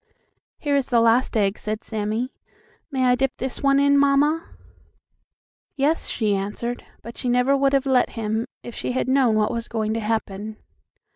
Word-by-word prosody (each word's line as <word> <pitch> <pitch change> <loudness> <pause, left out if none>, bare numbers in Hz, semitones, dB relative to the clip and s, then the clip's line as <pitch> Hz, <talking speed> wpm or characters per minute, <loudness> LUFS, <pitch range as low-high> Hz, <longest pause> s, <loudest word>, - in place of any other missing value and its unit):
"Here 290 -2 0
is 275 -2 +1
the 240 -3 +3
last 230 +1 +3
egg," 200 -1 +1
said 215 +1 -4
Sammie. 220 +4 -3 0.6
"May 265 -3 0
I 250 - +5
dip 265 +1 0
this 260 0 -4
one 275 -1 +4
in, 280 0 +4
mamma?" 290 +4 +3 1.3
"Yes," 295 +4 +1
she 215 -3 0
answered, 210 +5 -4 0.2
but 235 - -9
she 250 - -2
never 250 +3 +3
would 275 0 +2
have 275 0 +2
let 260 -2 +3
him 220 +2 -1 0.2
if 240 - -8
she 250 - -3
had 255 - -1
known 260 -4 +3
what 215 0 +2
was 235 -1 -4
going 220 -1 -2
to 225 - -1
happen. 215 -1 -3
245 Hz, 180 wpm, -23 LUFS, 220-275 Hz, 1.3 s, I